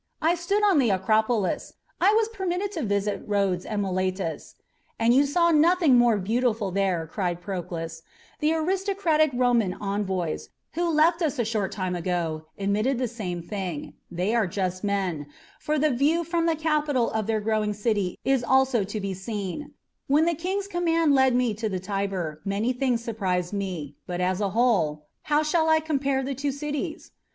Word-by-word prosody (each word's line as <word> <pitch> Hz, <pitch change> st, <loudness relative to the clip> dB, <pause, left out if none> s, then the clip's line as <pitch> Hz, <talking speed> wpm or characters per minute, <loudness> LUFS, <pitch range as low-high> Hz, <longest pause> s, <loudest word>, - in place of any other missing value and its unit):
"I 325 Hz, +2 st, +3 dB
stood 365 Hz, +5 st, 0 dB
on 390 Hz, -7 st, +5 dB
the 245 Hz, -4 st, +3 dB
Acropolis; 215 Hz, +2 st, +1 dB, 0.3 s
I 385 Hz, +3 st, +5 dB
was 445 Hz, -1 st, +3 dB
permitted 385 Hz, -2 st, -2 dB
to 340 Hz, -6 st, -4 dB
visit 205 Hz, -3 st, -1 dB
Rhodes 195 Hz, -3 st, 0 dB
and 210 Hz, -2 st, -1 dB
Miletus 185 Hz, -4 st, -2 dB, 0.2 s
" -, -, -41 dB
"And 230 Hz, +1 st, +4 dB
you 280 Hz, +3 st, +4 dB
saw 340 Hz, +4 st, +3 dB
nothing 325 Hz, -2 st, +4 dB
more 240 Hz, -3 st, +5 dB
beautiful 220 Hz, 0 st, 0 dB
there," 185 Hz, -3 st, 0 dB
cried 175 Hz, +1 st, -2 dB
Proclus. 170 Hz, -3 st, -5 dB, 0.4 s
"The 310 Hz, +2 st, +2 dB
aristocratic 360 Hz, -2 st, +1 dB
Roman 245 Hz, -6 st, +2 dB
envoys, 195 Hz, -5 st, -2 dB, 0.2 s
who 345 Hz, +2 st, 0 dB
left 330 Hz, +2 st, +3 dB
us 300 Hz, -3 st, 0 dB
a 240 Hz, -, 0 dB
short 215 Hz, -3 st, -1 dB
time 185 Hz, -3 st, -2 dB
ago, 165 Hz, -3 st, -2 dB
admitted 210 Hz, +6 st, 0 dB
the 250 Hz, 0 st, 0 dB
same 185 Hz, -7 st, -5 dB
thing. 180 Hz, -6 st, -5 dB, 0.2 s
They 180 Hz, +5 st, -1 dB
are 225 Hz, -5 st, +2 dB
just 185 Hz, 0 st, -3 dB
men, 190 Hz, -7 st, -1 dB, 0.3 s
for 305 Hz, +1 st, -1 dB
the 300 Hz, +1 st, +2 dB
view 295 Hz, +7 st, +2 dB
from 335 Hz, 0 st, 0 dB
the 330 Hz, -, +2 dB
Capitol 300 Hz, -5 st, +1 dB
of 220 Hz, -2 st, -2 dB
their 220 Hz, -1 st, +1 dB
growing 215 Hz, -1 st, 0 dB
city 205 Hz, -4 st, -1 dB
is 270 Hz, -2 st, +2 dB
also 265 Hz, -3 st, +3 dB
to 205 Hz, +3 st, -4 dB
be 195 Hz, -1 st, -3 dB
seen. 210 Hz, +8 st, -5 dB, 0.3 s
When 295 Hz, +4 st, +4 dB
the 340 Hz, -, +2 dB
King's 375 Hz, +5 st, -2 dB
command 330 Hz, -4 st, +2 dB
led 265 Hz, -2 st, +4 dB
me 245 Hz, -3 st, +2 dB
to 220 Hz, +1 st, -3 dB
the 190 Hz, -2 st, -2 dB
Tiber, 185 Hz, -5 st, -3 dB
many 205 Hz, +5 st, 0 dB
things 245 Hz, -2 st, 0 dB
surprised 190 Hz, -5 st, -2 dB
me; 180 Hz, -8 st, -4 dB
but, 180 Hz, 0 st, -3 dB
as 185 Hz, +2 st, 0 dB
a 200 Hz, -, +1 dB
whole, 190 Hz, -10 st, +1 dB, 0.2 s
how 300 Hz, +1 st, +3 dB
shall 320 Hz, +1 st, +2 dB
I 315 Hz, 0 st, +5 dB
compare 275 Hz, -4 st, 0 dB
the 275 Hz, +1 st, -2 dB
two 275 Hz, +2 st, -2 dB
cities? 295 Hz, +4 st, -5 dB
225 Hz, 180 wpm, -26 LUFS, 190-300 Hz, 0.4 s, on